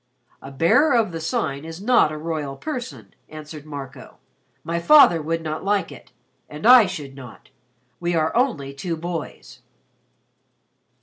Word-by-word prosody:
"A 135 - -10
Bearer 170 - +3
of 225 -5 +1
the 165 - -5
Sign 140 -3 -2
is 165 +1 -9
not 225 -6 +3
a 155 - -6
royal 150 -3 -4
person," 150 - -7 0.2
answered 155 -1 -10
Marco. 140 -3 -9 0.5
"My 170 +1 -2
father 175 - +6
would 165 +2 -3
not 155 0 -5
like 200 -3 0
it - - -14 0.4
and 150 +4 -8
I 245 -3 +8
should 150 -7 -7
not. 130 -4 -13 0.5
We 175 0 -1
are 160 -1 0
only 190 - 0
two 165 +4 -4
boys." 165 -1 -7
160 Hz, 145 wpm, -22 LUFS, 145-185 Hz, 0.5 s, I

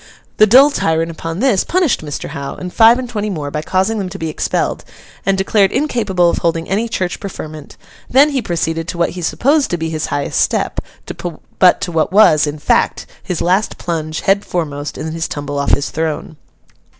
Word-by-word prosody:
The 215 - +6
dull 265 +7 +7
tyrant, 165 - 0
upon 165 +3 -5
this, 250 -8 +3
punished 350 - +1
Mr. 145 -2 -5
Hough, 140 0 -6
and 180 -1 -7
five 230 +1 +6
and 255 -1 -4
twenty 215 -3 -3
more, 150 -7 -4
by 150 - -2
causing 190 +7 0
them 190 -2 -3
to - - -8
be 160 - -3
expelled 155 - -2 0.4
and 195 0 +3
declared 195 0 +2
incapable 220 - +1
of 170 - +1
holding 165 -1 -1
any 215 +5 -1
church 185 -4 -2
preferment; 155 -6 -8 0.3
then 275 +4 +5
he 270 -2 0
proceeded 165 -3 -2
to 175 - -5
what 170 - +1
he 180 - -7
supposed 270 - +1
to 175 - -1
be 160 -1 -3
his 155 -1 -2
highest 145 0 -1
step, - - 0 0.8
but 180 -1 +5
to 175 - -3
what 160 0 0
was, 170 -7 +5
in 145 +1 -4
fact, 150 - +1 0.2
his 180 - -4
last 185 +5 +1
plunge 155 -2 -3
head 200 +1 +2
foremost 145 -4 -4
in 160 - -4
his 165 0 -3
tumble 145 -1 -4
off 140 - -1
his 140 -4 -4
throne. 160 +2 -3
175 Hz, 200 wpm, -17 LUFS, 155-210 Hz, 0.8 s, dull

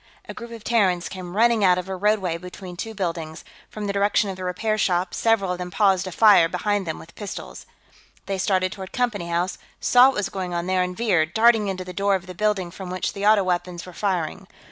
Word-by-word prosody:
A - - -6
group 235 - -9
of 230 -2 -10
Terrans 190 -7 +1
came 185 -1 -8
running 230 -1 +4
out 180 -2 +5
of 180 - -4
a 190 - -4
roadway 195 -3 +1
between 180 0 -9
two 220 +5 -6
buildings, 165 -4 -4 0.3
from 215 -1 -6
the 200 - -2
direction 200 0 +2
of - - -7
the 185 - -8
repair 215 +4 -1
shops; 180 -3 0
several 225 -5 +2
of 180 - -3
them 180 0 -4
paused 190 +1 +2
to 185 - -5
fire 200 -4 +6
behind 200 +1 -1
them 160 - -3
with 165 - -13
pistols. 205 -2 -8 0.6
They 195 -1 -3
started 185 -1 +1
toward 190 -2 -8
Company 220 -8 -1
House, 175 +2 -1 0.2
saw 250 +1 +6
what 270 - 0
was 205 - -1
going 185 -2 -4
on 170 0 -2
there, 185 0 +1
and 180 0 -3
veered, 175 -8 +1
darting 225 -2 +4
into 185 -1 -4
the 180 - -8
door 200 +1 +1
of 190 -1 -4
the 185 - -8
building 195 -2 -1
from 185 +1 -8
which 185 0 -3
the 200 0 -1
auto 215 -2 +5
weapons 180 -1 -2
were 180 - -11
firing. 185 -1 -2
190 Hz, 230 wpm, -23 LUFS, 180-210 Hz, 0.6 s, fire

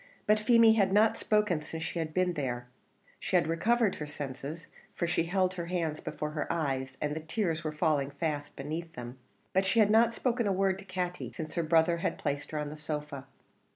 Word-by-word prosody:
But 215 0 +4
Feemy 230 0 +6
had 200 -4 +3
not 215 +2 +5
spoken 210 -7 +1
since 160 +2 -6
she 170 - -3
had 160 -1 -2
been 180 +1 +1
there; 125 -5 -3 0.5
she - - -2
had - - +5
recovered 210 +7 +2
her 150 - -5
senses, 145 +2 -6 0.3
for - - 0
she 170 -1 +1
held 185 +1 +1
her 170 -2 -5
hands 165 -4 -1
before 150 0 -4
her 150 -1 -2
eyes, 135 -4 -2
and 150 0 -1
the - - -2
tears 165 0 -2
were 155 - -2
falling 150 -3 +1
fast 145 0 -3
beneath 160 +4 -5
them: 125 +1 -8 0.3
but 190 - +3
she 190 +4 0
had 210 -1 +5
not 225 +1 +5
spoken 235 -1 0
a - - +2
word 190 0 +1
to 195 - -11
Katty 180 -1 -3
since 155 -2 -6
her 170 - 0
brother 165 +1 +3
had 170 - -2
placed 140 +1 -3
her 155 - -4
on 150 -1 -3
the 155 - -8
sofa. 150 -3 -5
165 Hz, 215 wpm, -30 LUFS, 150-190 Hz, 0.5 s, Feemy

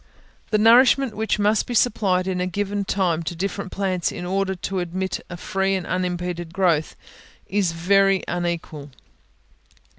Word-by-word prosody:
The 215 - +2
nourishment 245 +3 +5
which 220 0 0
must 210 +1 +2
be 245 - -3
supplied 190 -6 +2
in 185 -1 -1
a 180 - 0
given 200 +2 -2
time 180 -4 0
to 170 +1 -5
different 195 +2 -4
plants, 185 -3 -1
in 180 - -6
order 190 +1 -1
to 190 +1 -3
admit 185 +2 -3
a 175 - -7
free 195 +1 -1
and 185 - -3
unimpeded 180 -2 -3
growth, 170 -5 +1 0.5
is 195 -3 0
very 195 +3 +3
unequal. 170 -4 -4
190 Hz, 150 wpm, -22 LUFS, 175-200 Hz, 0.5 s, nourishment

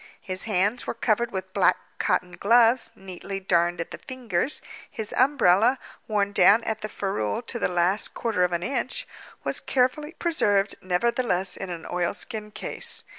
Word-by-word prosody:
His 185 0 -3
hands 210 +3 0
were - - -3
covered 230 0 +1
with 190 -1 -6
black - - +3 0.2
cotton 180 0 0
gloves 230 +4 +3
neatly 195 0 -7
darned 175 -2 +1
at 165 - -4
the - - -7
fingers; 255 - +1 0.3
his 220 -1 -3
umbrella, 250 -3 +4 0.3
worn 205 -2 0
down 205 +3 +5
at 220 0 -3
the 215 - -4
ferule 195 - -2
to 240 0 -3
the - - +1
last 180 +3 +1
quarter 225 -6 0
of 180 - +1
an 170 0 -2
inch, 260 +3 -3 0.4
was - - -1
carefully 275 +5 0
preserved, 205 - +1
nevertheless, 185 -1 0
in 190 - -6
an 170 -2 -6
oilskin 205 +4 -2
case. - - -1
205 Hz, 160 wpm, -25 LUFS, 180-235 Hz, 0.4 s, down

